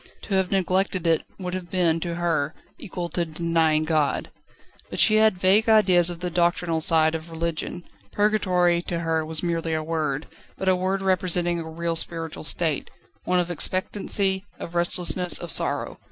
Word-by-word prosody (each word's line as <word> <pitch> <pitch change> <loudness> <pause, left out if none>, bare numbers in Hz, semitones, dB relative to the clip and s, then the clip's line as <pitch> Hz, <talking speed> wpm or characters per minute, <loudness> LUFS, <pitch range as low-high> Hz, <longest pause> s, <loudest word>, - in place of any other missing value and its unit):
To 200 - -5
have 190 -1 +1
neglected 190 -1 0
it 165 -1 +2 0.2
would 180 -2 -5
have 185 -2 -5
been, 170 -3 +1
to 170 0 -4
her, 165 -4 -1 0.2
equal 180 -4 -5
to 175 - -1
denying 160 -1 0
God. 155 -3 0 0.6
She 215 -1 +4
had 220 -2 +4
but 180 - -17
vague 205 +4 +4
ideas 185 -6 +5
of 175 -1 -7
the 180 -1 -3
doctrinal 170 -1 0
side 160 -3 +3
of 160 +1 -6
religion. 165 +1 -4 0.3
Purgatory 185 -5 +2
was 175 - -5
to 170 - -3
her 165 -1 0 0.2
merely 165 -2 -1
a 155 - -2
word, 155 -2 -2 0.3
but 190 - -4
a 185 - +4
word 190 +1 -2
representing 175 -2 0
a 160 -1 -6
real 165 +1 -3
spiritual 165 -1 -1
state 160 -2 0 0.4
one 180 0 +2
of 175 0 -1
expectancy, 190 +2 0
of 170 - -8
restlessness, 175 +1 +2
of 170 -2 -5
sorrow. - - 0
175 Hz, 170 wpm, -24 LUFS, 165-185 Hz, 0.6 s, ideas